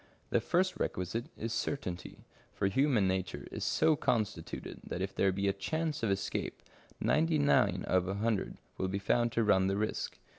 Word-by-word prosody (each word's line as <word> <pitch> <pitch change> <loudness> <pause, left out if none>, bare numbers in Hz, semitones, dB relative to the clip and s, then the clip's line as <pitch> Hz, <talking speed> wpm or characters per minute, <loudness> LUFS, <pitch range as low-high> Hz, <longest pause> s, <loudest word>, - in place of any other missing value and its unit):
The - - +3
first 185 +1 +1
requisite 90 +7 -2
is 115 0 -3
certainty, 90 -8 -4 0.3
for - - 0
human 115 0 +3
nature 95 -2 -2
is - - -4
so 160 - +3
constituted 105 - -2
that - - -5
if 95 +1 -2
there 95 0 +3
be 100 +1 -1
a 100 - +3
chance 155 +10 -2
of 115 - +1
escape, 100 0 -2 0.4
ninety 160 0 +2
nine 100 -10 +3
out 95 - +3
of 90 0 0
a 95 - -1
hundred 110 -1 -1 0.2
will 95 - +1
be 95 +1 -1
found 120 +4 +2
to 115 - +2
run 95 -3 +4
the 95 +1 0
risk. 110 +1 -2
100 Hz, 185 wpm, -32 LUFS, 95-120 Hz, 0.4 s, run